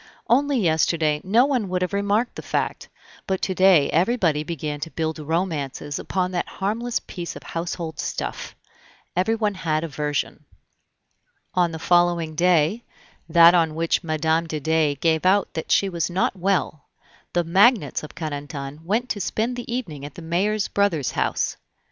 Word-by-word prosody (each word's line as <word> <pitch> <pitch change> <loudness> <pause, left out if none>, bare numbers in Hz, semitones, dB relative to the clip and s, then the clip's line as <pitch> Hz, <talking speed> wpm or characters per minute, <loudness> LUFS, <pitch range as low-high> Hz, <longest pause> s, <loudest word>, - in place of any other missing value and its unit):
Only 275 +3 +3
yesterday 160 -4 +2
no 225 +7 +4
one 250 -9 0
would 180 0 0
have 180 - -3
remarked 205 +4 +1
the - - -7
fact, - - -3 0.4
but 190 -1 0
to 190 - 0
day 185 -6 +5
everybody 170 -4 +2
began 150 -2 -4
to 165 - -5
build 160 -1 -3
romances 150 -3 -2
upon 185 -1 -1
that 175 -1 -2
harmless 225 +5 -2
piece 175 -2 -7
of - - -10
household 165 -1 -5
stuff. - - -4 0.6
Everyone 210 +3 +1
had 160 -4 -1
a - - -2
version. 150 0 -3 1.1
On 180 -2 +2
the 160 - -5
following 175 -1 +2
day, 175 +5 +2 0.5
that 170 +1 +7
on 165 -3 +2
which 165 +2 0
Mme. 160 +1 0
de 155 -1 -3
Dey 155 -1 +1
gave 160 +2 +1
out 190 +2 +2
that 160 - -5
she 200 - +4
was 170 -3 -2
not 185 +3 0
well, 185 -5 -1 0.5
the 175 - +2
magnates 190 - +3
of 155 - -10
Carentan 145 -1 -6
went 220 +8 0
to 205 - -2
spend 225 +6 -1
the 245 -1 -6
evening 170 - -4
at 145 0 -8
the 170 - -9
mayor's 195 +5 0
brother's 175 -9 0
house. - - -1
170 Hz, 160 wpm, -23 LUFS, 155-195 Hz, 1.1 s, that